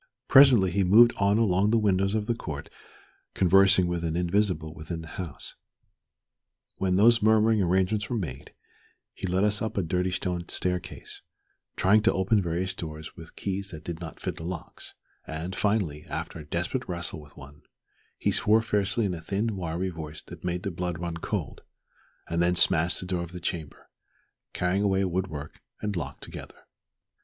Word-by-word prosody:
Presently 130 -9 +7
he 100 +2 +1
moved 115 +6 +7
on 100 +1 +3
along 100 -2 +3
the 115 - +3
windows 100 -1 +2
of 105 -1 0
the 120 - +1
court 75 -10 -6 0.7
conversing 95 0 +5
with 85 -1 -2
an 80 -1 -1
invisible 90 -3 0
within 80 +1 -6
the 80 - -10
house. 85 -6 -7 1.2
When 95 -1 +1
those 115 +4 +5
murmuring 110 0 +4
arrangements 95 +4 +1
were 120 - -1
made, 75 - -6 0.6
he 95 - -5
led 90 +2 +1
us 105 0 +2
up 110 - -3
a 100 - +2
dirty 90 +3 0
stone 90 -1 -3
staircase, 90 -1 -4 0.5
trying 105 +3 +4
to 110 - +3
open 100 +3 +2
various 90 +2 -2
doors 80 -1 -7
with 80 0 -12
keys 100 0 -3
that 80 -3 -9
did 85 -1 -5
not 80 - -8
fit - - -4
the - - -7
locks; 90 +1 -7 0.3
and 80 +5 -5
finally, 100 -9 -1
after - - -5
a 75 - -9
desperate 85 - -2
wrestle 85 -3 -4
with 75 -1 -17
one, 70 +3 -13 0.6
he - - +1
swore 110 +1 +3
fiercely 105 0 0
in 95 - -1
a 85 - -6
thin, 100 +6 -1
wiry 90 0 -2
voice 80 -3 -8
that - - -12
made 90 0 -2
the 100 - -2
blood 90 0 -3
run 85 -1 -4
cold, - - -4 0.7
and 85 +1 0
then 90 +1 +3
smashed 85 0 +3
the - - -6
door 90 -1 -1
of 85 0 -7
the 90 - -6
chamber, 85 -3 -5 0.6
carrying 90 +2 0
away 95 -1 +2
wood 95 +1 -1
work 75 -3 -8 0.2
and 105 -2 -3
lock 85 - -5
together. - - -10
90 Hz, 180 wpm, -27 LUFS, 85-100 Hz, 1.2 s, Presently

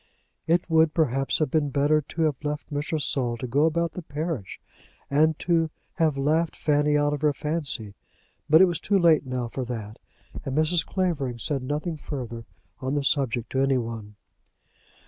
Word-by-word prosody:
It 170 +2 +2
would, 160 -1 +3
perhaps, 135 -4 +1
have 155 -4 0
been 150 -3 +1
better 145 +3 +2
to 160 +3 -3
have 150 -2 0
left 150 +1 -4
Mr. 145 +2 -1
Saul 125 -4 0
to 120 - -5
go 140 +5 +2
about 170 +1 0
the 180 - -7
parish, 150 - -4 0.5
and 155 +2 +3
to 165 -2 +1 0.3
have 155 -4 +2
laughed 155 +4 +1
Fanny 150 0 +2
out 145 0 +2
of 145 - -4
her 150 -1 +3
fancy. 145 -9 -2 0.6
But 160 +3 +7
it - - +9
was 175 -2 -1
too 200 - +2
late 165 -6 +4
now 125 -2 -2
for 130 +3 -4
that, 110 -3 -6 0.4
and 135 +1 -3
Mrs. 155 +1 +3
Clavering 155 -10 -1
said 135 +3 -2
nothing 150 +5 -3
further 120 -6 -6 0.3
on 130 +2 -2
the 145 - 0
subject 130 -5 0
to 135 - +1
any 135 -1 +3
one. 115 -3 -5
145 Hz, 180 wpm, -25 LUFS, 130-160 Hz, 0.6 s, it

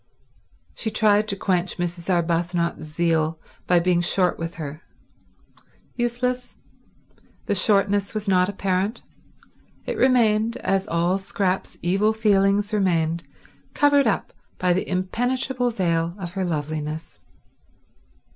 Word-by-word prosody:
She 220 - -3
tried 210 -1 +3
to 200 - -2
quench 185 -2 -1
Mrs. 175 0 -3
Arbuthnot's 170 -1 0
zeal 160 0 0 0.3
by 180 -1 +4
being 175 0 +2
short 180 0 +2
with 165 +1 -4
her. 155 0 -7 1.1
Useless. 245 +1 -2 0.9
The - - 0
shortness 200 +1 +2
was 215 -1 -3
not 185 -1 +3
apparent. 195 +2 -1 0.8
It - - -3
remained, 230 -2 +3
as 195 -5 0
all 170 +3 +1
Scrap's 190 -1 -2
evil 195 +5 +2
feelings 205 -1 +2
remained, 170 -5 +1 0.5
covered 285 -2 +4
up 210 - -1 0.2
by 180 -1 +2
the 185 - -2
impenetrable 245 +7 -1
veil 170 -5 0
of 175 -4 -6
her 190 0 -2
loveliness. 155 -1 -4
190 Hz, 115 wpm, -23 LUFS, 170-215 Hz, 1.1 s, by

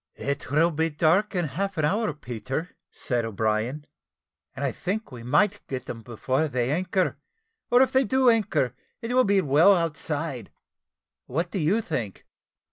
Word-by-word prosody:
"It 140 0 -3
will 160 +5 +3
be 160 +1 0
dark 170 +7 +2
in 175 -2 +1
half 190 +6 -3
an 155 - +2
hour, 210 +5 +1
Peter," 135 +3 -5
said 120 -2 -1
O'Brien, 110 +6 -1 0.7
"and 140 +1 -3
I 135 - 0
think 195 - -4
we 120 -2 -9
might 200 - +2
get 130 -1 -5
them 115 - -7
before 130 +6 -1
they 125 -2 -1
anchor, 185 +3 0 0.5
or 245 +2 +6
if 265 - 0
they 265 +1 +4
do 260 +2 +2
anchor, 195 - +2 0.3
it 230 +2 -2
will 255 0 +4
be 200 -1 +3
well 160 +6 +5
outside. 150 - -3 0.8
What 165 +7 -2
do 195 - -2
you 180 +8 +2
think?" 120 - -4
155 Hz, 165 wpm, -26 LUFS, 130-195 Hz, 0.8 s, or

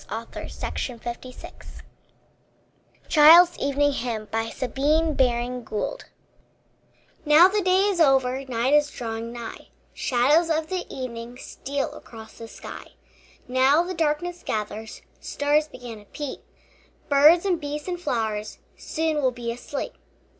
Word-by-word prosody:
ISAAC 230 +2 -6
WATTS 245 +1 -9 1.2
CHILD'S 335 +3 +8
EVENING 285 +1 +1
HYMN 230 -4 -3 3.0
Now 305 +4 +7
the 410 +2 0
day 370 0 +3
is 400 -4 0
over, 270 -3 +3
Night 250 +1 0
is 295 0 +4
drawing 230 -3 -5
nigh, 235 -1 -8 0.3
Shadows 290 +7 +2
of 315 -1 0
the 370 -1 -3
evening 240 -2 -6
Steal 275 +1 -4
across 220 -1 -12
the 230 - -8
sky. - - -10 0.5
Now 260 +6 +4
the 365 +1 -5
darkness 335 +2 -1
gathers, 215 +1 -5 0.2
Stars 295 +1 0
begin 240 -6 -10
to 205 - -17
peep, 290 +5 -6 0.7
Birds 300 +6 +6
and 360 -4 0
beasts 295 +2 -5
and 355 -1 -4
flowers 220 -8 -2 0.2
Soon 320 -1 -2
will 260 - +3
be 240 -1 -5
asleep. 245 +4 -5
275 Hz, 115 wpm, -24 LUFS, 235-315 Hz, 3.0 s, CHILD'S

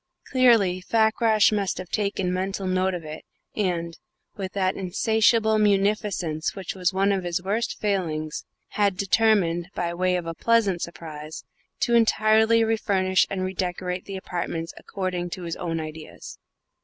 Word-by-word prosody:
Clearly 230 -8 +4
Fakrash 220 +1 +3
must 200 -3 -1
have 185 -1 -7
taken 200 -3 -1
a - - -1
mental 190 +1 -2
note 185 0 +1
of 170 -3 -7
it, 155 0 -8 0.3
and, 170 -5 -2 0.4
with 190 -1 -5
that 190 -1 0
insatiable 220 +3 +2
munificence 200 -6 0
which 190 -3 -5
was 180 -2 0
one 195 +1 +2
of 195 -2 0
his 175 0 -2
worst 215 +5 -1
failings, 165 -7 -2 0.3
had 200 -3 +1
determined, 195 -4 +2
by 170 -1 -2
way 180 +1 +1
of 175 -2 -2
a 165 - -4
pleasant 205 -3 +2
surprise, 155 -2 -7 0.4
to 235 - +1
entirely 220 0 +4
refurnish 195 -4 +2
and 190 -1 -2
redecorate 180 -1 -3
the 195 -1 -6
apartments 170 -3 -4
according 185 -2 -4
to 180 +1 -6
his 170 -1 -4
own 165 -2 -3
ideas. 155 0 -9
190 Hz, 150 wpm, -25 LUFS, 175-210 Hz, 0.4 s, Clearly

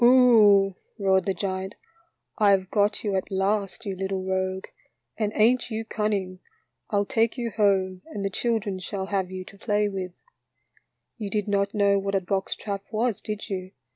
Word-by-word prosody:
" - - +3
Oho," 220 -6 +6 0.2
roared 190 -2 +2
the 195 - +2
giant, 190 +1 -3 0.3
" 335 - -47
I 210 -2 +5
have 190 -2 +2
got 205 0 +2
you 205 -3 0
at 190 - -2
last, 200 +3 -1
you 195 -2 -3
little 190 0 -2
rogue, 190 0 -1 0.5
and 215 -2 -1
ain't 235 +3 +3
you 225 0 -3
cun 215 -1 -1
ning? 185 -3 -2 0.5
I'll 205 -1 +1
take 230 +2 +1
you 235 -2 -2
home 195 -3 +1
and 200 -2 -5
the 195 - -1
children 215 -3 -1
shall 190 +1 -4
have 190 -2 0
you 185 0 -6
to 200 - -14
play 210 -1 +1
with. 185 -2 -5 0.5
" - - -41
You 210 -2 -3
did 210 0 -1
not 200 +1 0
know 200 -1 +4
what 195 0 -2
a - - +4
box 190 +1 -2
trap 200 -2 -4
was, 225 -1 0
did 210 -1 -5
you? 185 -2 -5
200 Hz, 195 wpm, -26 LUFS, 190-215 Hz, 0.5 s, Oho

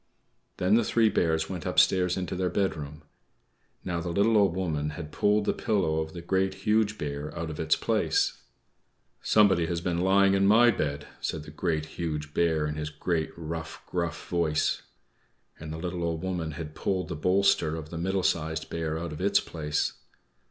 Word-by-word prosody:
Then 90 +3 +2
the 115 +1 +5
three 115 0 +3
Bears 80 -4 +1
went 90 -4 -5
upstairs 90 -1 +3
into 90 0 -3
their 90 0 0
bedroom. 75 -6 -2 0.8
Now, 85 -1 -2
the 85 - -4
little 100 +6 +3
Old 100 -5 +4
Woman 80 -5 -1
had 75 -3 -7
pulled 105 0 +2
the - - +2
pillow 90 -7 0
of 80 0 -4
the 85 -2 -8
Great, 95 +1 0
Huge 105 0 +2
Bear 75 +1 -4
out 85 -1 -3
of 75 - -8
its - - +3
place. - - 0 0.8
"=Somebody 100 -6 +4
has 85 0 -1
been 85 0 -1
lying 95 +1 +4
in 100 0 +3
my 120 +4 +6
bed!=" 75 -6 -2
said 80 - -3
the 75 - -11
Great, 80 0 -1
Huge 75 -2 -4
Bear, 80 -3 +2
in 75 0 -3
his 75 0 -3
great, 80 +1 -1
rough, 80 0 -6
gruff 85 -2 -3
voice. 80 -3 +1 0.8
And 80 0 -7
the 80 - -5
little 90 +1 -4
Old 85 0 -2
Woman 85 -4 -2
had 75 0 -7
pulled 95 +3 -1
the 85 - -4
bolster 90 -1 +2
of 80 -1 -7
the 85 - -5
Middle 95 +2 0
Sized 80 -2 -1
Bear 80 -1 -2
out 85 -1 -4
of 75 - -7
its 100 +2 +4
place. 75 -2 -2
85 Hz, 185 wpm, -28 LUFS, 80-95 Hz, 0.8 s, my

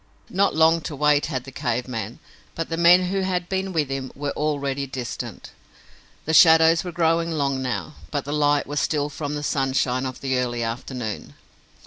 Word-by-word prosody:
Not 195 -3 +2
long 160 +1 +4
to 150 - -6
wait 150 0 +2
had 130 -5 -3
the 135 - -10
cave 125 -2 -2
man, 115 -2 -5 0.4
but 165 - -4
the 165 - -1
men 175 +2 +5
who 195 +1 -1
had 180 -2 -1
been 190 0 -2
with 155 -6 0
him 135 -1 -4
were 145 +1 -3
already 140 -2 -2
distant. 125 -2 -6 0.7
The 160 - -1
shadows 160 0 +6
were 180 - -5
growing 165 0 +1
long 140 -4 -1
now, 105 -10 -3 0.2
but - - -3
the 145 - -4
light 145 -1 +2
was 145 +1 -2
still 145 0 0
from 145 0 -4
the 145 - -4
sunshine 135 -2 0
of 130 - -8
the 130 -2 0
early 120 -2 -2
afternoon. 115 -1 -5
145 Hz, 185 wpm, -23 LUFS, 130-165 Hz, 0.7 s, shadows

